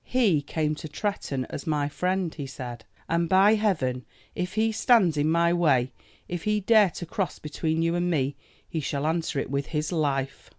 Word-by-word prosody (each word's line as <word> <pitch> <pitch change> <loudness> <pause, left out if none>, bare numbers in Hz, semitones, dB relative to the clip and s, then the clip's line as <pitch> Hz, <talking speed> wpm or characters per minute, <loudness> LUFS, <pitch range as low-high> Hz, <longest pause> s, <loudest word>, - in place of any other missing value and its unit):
"He 215 - +2
came 155 +1 -1
to 155 - -7
Tretton 150 -6 -3
as 140 - -6
my 150 -2 +1
friend," 180 +3 -1
he 145 -3 -6
said, 120 -4 -8 0.2
"and 170 0 0
by 195 +3 +6
Heaven 160 - 0 0.3
if 180 +1 -4
he 220 +1 +2
stands 215 -7 +4
in 150 +1 +1
my 170 +1 +3
way, 140 -8 +2 0.4
if 175 -2 -5
he 210 0 +2
dare 210 -1 +5
to 175 - -7
cross 180 0 -3
between 160 +2 -2
you 165 0 +1
and 175 0 0
me, 140 -4 0 0.3
he 160 - -3
shall 145 0 -2
answer 160 -1 -1
it 135 - -2
with 140 0 -1
his 150 0 -2
life!" 140 -5 -1
160 Hz, 195 wpm, -26 LUFS, 145-185 Hz, 0.4 s, by